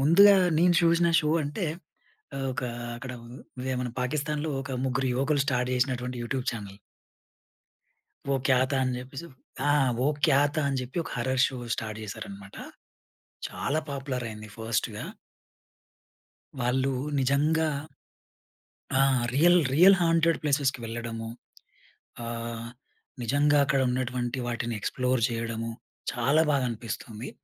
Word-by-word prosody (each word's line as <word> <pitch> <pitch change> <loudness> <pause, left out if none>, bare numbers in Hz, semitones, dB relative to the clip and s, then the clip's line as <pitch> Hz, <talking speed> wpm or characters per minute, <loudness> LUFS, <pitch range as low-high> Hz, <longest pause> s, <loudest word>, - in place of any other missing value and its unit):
ముందుగా 195 +8 +7 0.2
నేను 175 +1 +5
చూసిన 170 +1 +4
షో 150 - -1
అంటే 150 +7 -3 0.7
ఆహ్, 135 0 -2
ఒక 130 - -4 0.3
అక్కడ 130 +1 -7 0.5
అదే 130 +1 -2
మన 125 - -2
పాకిస్థాన్‌లో 150 +4 -1
ఒక 135 0 -6
ముగ్గురు 130 0 0
యువకులు 140 +2 +2
స్టార్ట్ 125 -2 +1
చేసినటువంటి 125 -1 -1
యూట్యూబ్ 125 +2 -2
చానెల్. 100 -3 -8 1.5
"వో 140 - +2
క్యా 130 -1 +5
థా?" 140 - +1
అని 130 -1 0
చెప్పేసి, 135 +5 -8 0.4
ఆహ్, 140 -3 +3
"వో 130 - +2 0.2
క్యా 135 - +5 0.2
థా?" 155 - +1
అని 135 -1 -1
చెప్పి, 125 +4 -9
ఒక - - -8
హారర్ 130 +2 +1
షో 130 - -6 0.2
స్టార్ట్ 110 -1 -5
చేశారన్నమాట. 100 -2 -8 0.9
చాలా 155 +3 -1
పాపులర్ 135 -3 -3
అయింది 110 0 -9
ఫాస్ట్‌గా. 110 0 -2 1.6
వాళ్ళు 130 +2 +1 0.3
నిజంగా 150 +4 +2 1.2
ఆ! 135 +1 +4 0.3
రియల్, 175 +5 +6
రియల్ 185 +6 +8
హాంటెడ్ 165 0 +3
ప్లేసెస్‌కి 140 -3 +1
వెళ్ళడము. 115 0 -5 1.0
ఆహ్, 115 0 -5 0.5
నిజంగా 145 +5 +3
అక్కడ 140 - +2
ఉన్నటువంటి 125 0 -2
వాటిని 120 -1 -2
ఎక్స్‌ప్లోర్ 125 +4 0
చేయడము, 115 0 -3 0.4
చాలా 140 +4 +3
బాగా 135 -3 +2
అనిపిస్తుంది. 115 0 -6
130 Hz, 120 wpm, -27 LUFS, 120-145 Hz, 1.6 s, రియల్